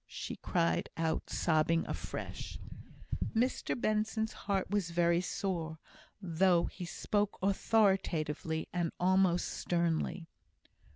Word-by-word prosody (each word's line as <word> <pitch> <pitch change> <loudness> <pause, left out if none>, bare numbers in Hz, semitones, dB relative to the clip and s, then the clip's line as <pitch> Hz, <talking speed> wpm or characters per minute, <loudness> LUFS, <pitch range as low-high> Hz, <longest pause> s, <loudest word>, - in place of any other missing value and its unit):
she - - -5
cried 170 -2 +1
out, 165 -1 -1
sobbing 165 0 +2
afresh. - - -5 0.8
Mr 245 +1 +1
Benson's 220 0 0
heart 195 -2 -1
was 205 -4 +1
very 170 0 +3
sore, 170 -4 -2 0.4
though 175 -1 +3
he 180 - -6
spoke 205 +3 -1
authoritatively, 190 -6 +1
and 175 -2 0
almost 185 -1 +3
sternly. 170 0 -1
175 Hz, 100 wpm, -33 LUFS, 165-200 Hz, 0.8 s, very